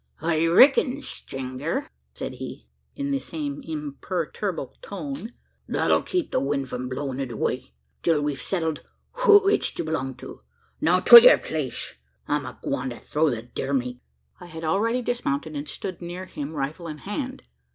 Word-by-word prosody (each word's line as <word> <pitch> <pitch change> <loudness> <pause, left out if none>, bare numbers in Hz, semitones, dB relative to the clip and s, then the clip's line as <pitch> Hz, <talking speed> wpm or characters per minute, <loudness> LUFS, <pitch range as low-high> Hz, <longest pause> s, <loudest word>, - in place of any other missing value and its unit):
"I 160 +1 +1
reck'n, 270 - +5
strenger," 135 - -4 0.3
said - - -5
he, - - -8 0.3
in 280 0 -2
the 275 - +1
same 145 - -5
imperturbable 160 +2 -4
tone, 175 - -6 0.3
"that'll - - +2
keep 360 -4 -2
the - - +2
wind 140 -1 -1
from 125 0 -4
blowin' 130 0 -3
it 135 -3 -3
away, 110 - -3 0.3
till 160 -3 +2
we've 145 -2 -2
settled 160 -5 -1 0.4
who 410 -3 +8
it's 415 - +3
to - - -3
belong 135 -5 -2
to. - - -10 0.4
Now, - - +4
to 475 - +12
yur - - +8
place! - - -3 0.3
I'm 145 -2 0
agwine 130 0 -3
to 120 - -8
throw 155 +1 +1
the 115 -4 -3
deer 135 +3 -4
meat!" 125 -1 -2 0.4
I 175 - -10
had 160 -1 -8
already 225 +10 +1
dismounted, 155 -11 -2
and 145 +1 -4
stood 185 -3 -5
near 175 +2 -6
him 150 -4 -6
rifle 150 +5 -3
in 155 -1 -6
hand. 255 - -5
160 Hz, 160 wpm, -25 LUFS, 140-200 Hz, 0.4 s, to